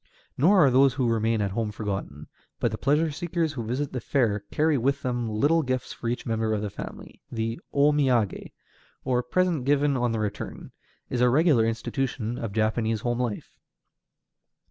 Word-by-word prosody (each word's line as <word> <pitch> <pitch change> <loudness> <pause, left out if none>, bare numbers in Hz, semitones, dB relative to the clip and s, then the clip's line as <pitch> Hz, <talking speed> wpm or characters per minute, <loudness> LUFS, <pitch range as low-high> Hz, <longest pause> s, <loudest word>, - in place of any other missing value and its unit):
Nor 180 +4 +5
are 135 - +4
those 135 +1 +4
who 130 -3 +1
remain 115 -1 +1
at 100 -1 -1
home 110 +1 -2
forgotten, 100 -8 -5 0.3
but 120 - +1
the 110 - -3
pleasure 150 +3 +2
seekers 165 0 -2
who 120 -5 -4
visit 130 +6 -3
the 125 - -3
fair 110 -5 +1
carry 155 +1 +2
away 130 -5 0
with 140 +1 +1
them 120 -2 -1
little 145 +10 +2
gifts 130 -3 -3
for 115 - -6
each 120 - -3
member 110 -1 0
of 105 - -3
the 105 - -3
family, - - -9
and - - -8
the 115 +1 -2
O 145 +1 +4
miagé, 130 -8 +1 0.5
or 125 -1 +1
present 170 +2 0
given 145 +1 +2
on 120 -2 +1
the 115 - -1
return, 105 -2 -5 0.4
is 125 - 0
a 125 - +5
regular 135 -4 +4
institution 120 0 -2
of 115 -3 -4
Japanese 110 +1 0
home 120 +1 -1
life. 120 -4 -4
125 Hz, 190 wpm, -26 LUFS, 110-140 Hz, 0.5 s, Nor